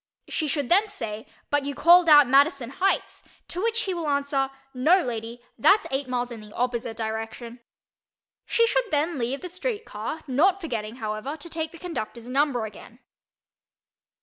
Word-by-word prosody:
She 310 - -2
should 285 -3 -2
then 405 +4 +4
say 225 - -6 0.2
"But 290 -1 +2
you 280 0 -4
called 345 +1 +6
out 290 -3 +8
Madison 275 -1 +3
Heights," 380 +7 0 0.3
to 360 - -4
which 460 +1 +1
he 380 - -2
will 335 -3 -3
answer 280 -1 0 0.2
"No, 320 +9 +4
lady—that's 240 - 0
eight 270 0 -1
miles 245 -1 -2
in 235 - -7
the 210 0 -13
opposite 235 -2 -2
direction." 225 +2 -5 0.9
She 465 - +4
should - - 0
then 305 +1 0
leave 250 +4 -2
the 365 - -5
street 415 +5 -4
car, 220 +10 -5
not 330 +9 +3
forgetting, 230 - -4
however, 220 +5 -4
to 320 +3 -10
take 320 -1 -3
the 335 - -12
conductor's 245 -10 -6
number 260 -3 +1
again. 220 +2 -12
280 Hz, 165 wpm, -25 LUFS, 235-340 Hz, 0.9 s, out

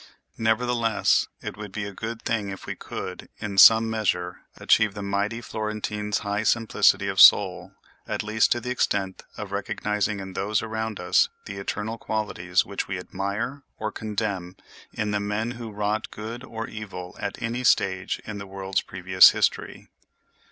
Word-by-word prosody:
Nevertheless, 115 0 +2 0.2
it - - -6
would 105 -2 -7
be 100 +1 -4
a 100 - -7
good 115 +3 -6
thing 105 -3 -1
if 95 - -7
we - - -4
could, - - -7
in 100 -2 -2
some 115 +2 +9
measure, 90 -5 -1 0.2
achieve 110 -2 +3
the 100 - -5
mighty 100 +3 -1
Florentine's 105 -1 -3
high 100 +1 0
simplicity 115 0 +3
of - - +2
soul, - - +6 0.3
at - - -2
least 110 +1 +2
to 120 - +3
the 125 +2 -4
extent 95 -6 -1 0.2
of - - -6
recognizing 105 0 -1
in 95 -1 -7
those 105 +3 0
around 110 -1 -3
us - - +3 0.2
the 100 - -7
eternal 105 +3 -4
qualities 90 -5 -1
which 100 - -4
we 95 - -3
admire 100 +9 -4 0.2
or 110 0 -3
condemn 100 -4 -3 0.4
in 105 0 -2
the 105 - 0
men 105 +3 -2
who 120 -2 -7
wrought 105 +1 -2
good 115 +4 -7
or 115 -3 -6
evil 95 -4 -8
at 100 - -4
any 120 +2 -3
stage 95 -5 +2
in 105 -1 -6
the 100 - -8
world's 95 0 -2
previous 95 0 +6
history. - - -1
105 Hz, 165 wpm, -25 LUFS, 100-110 Hz, 0.4 s, some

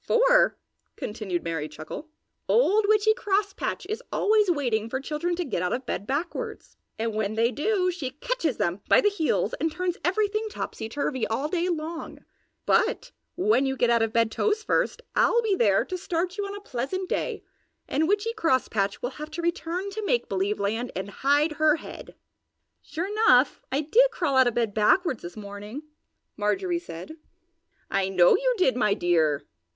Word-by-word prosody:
"For," - - +4 0.4
continued 210 -5 -4
Merry 165 -3 -3
Chuckle, 155 - -8 0.4
"Old 435 -3 +4
Witchy 430 +1 +4
Crosspatch 410 -4 -1
is 430 +2 -3
always 425 -2 +3
waiting 240 -9 0
for 260 - -2
children 310 +5 -2
to 355 0 -2
get 255 - -2
out 180 - 0
of 255 +1 -3
bed 200 - -4
backwards. 350 - -4 0.2
And 225 0 -2
when 215 0 -1
they 230 +2 +2
do, 365 - +1
she 320 -7 -4
catches 320 - -2
them 175 +3 -1
by - - +7
the 415 - +3
heels 330 -6 0
and 325 - 0
turns 360 +2 -2
everything 425 +4 0
topsy 225 - -5
turvy 260 -2 -2
all 260 +7 -1
day 355 +1 0
long; 325 0 -5 0.4
but - - +1 0.2
when 360 -7 +2
you 265 0 -2
get 245 -1 +3
out 235 -1 +3
of 225 -1 +1
bed 230 -1 +2
toes 430 - 0
first, 475 - 0
I'll 475 - +4
be 420 -3 +2
there 205 - +3
to 370 - -4
start 355 0 -2
you 405 -1 -3
on 400 - -6
a 405 - -8
pleasant 370 +5 -3
day - - -2 0.4
and 315 +3 +1
Witchy 415 +4 +1
Crosspatch 255 - 0
will 245 - -2
have 305 - -5
to 320 +2 -5
return 345 +2 -2
to 430 +2 -5
Make 480 +4 +1
Believe 195 +2 -1
Land 225 +5 -1
and 195 +2 -4
hide 290 +7 +2
her 305 0 +3
head!" 325 - -10 0.7
"Sure 335 +2 -4
enough, 390 - +3
I 275 +3 +1
did 460 +12 +4
crawl 330 - -1
out 260 -1 +6
of 240 - -1
bed 230 -4 0
backwards 255 - +2
this 175 +4 -9
morning!" 205 +6 -8 0.5
Marjorie 345 - 0
said. 315 - -9 0.7
"I 195 -1 +1
know 180 -2 +5
you - - +1
did, 315 -10 +3
my 210 -5 +2
dear!" 160 -5 +2
305 Hz, 180 wpm, -26 LUFS, -, 0.7 s, by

